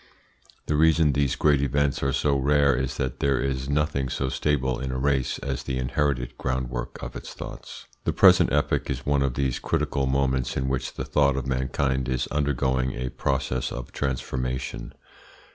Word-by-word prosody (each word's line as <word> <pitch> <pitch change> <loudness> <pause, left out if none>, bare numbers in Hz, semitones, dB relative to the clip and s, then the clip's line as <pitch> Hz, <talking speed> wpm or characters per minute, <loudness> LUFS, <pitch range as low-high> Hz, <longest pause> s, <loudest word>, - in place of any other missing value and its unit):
The 75 - 0
reason 80 -1 +4
these 70 -3 +1
great 75 -2 +3
events 70 +1 +1
are 70 - +1
so 70 0 +1
rare 70 0 +3
is 65 0 -2
that 65 -2 -2
there 70 -1 +2
is 65 0 -2
nothing 70 -2 0
so 65 +2 -1
stable 65 -4 0
in 65 0 -3
a 65 - -3
race 65 -1 +1
as 70 -2 -3
the 65 -1 -3
inherited 65 -1 -1
groundwork 65 -2 -3
of - - -6
its - - -8
thoughts. - - -9 0.2
The - - +2
present - - +6
epoch - - +1
is 70 0 -3
one 70 -1 +2
of 65 -3 0
these 70 -3 0
critical 75 -4 0
moments 65 -1 0
in 65 - -1
which 65 0 -2
the - - -4
thought 70 -2 +2
of 65 - -2
mankind 65 0 -1
is 65 -1 0
undergoing 65 -3 0
a 65 +1 -3
process 65 -1 -1
of 60 -1 -6
transformation. 65 -2 -3
65 Hz, 180 wpm, -25 LUFS, 65-70 Hz, 0.2 s, present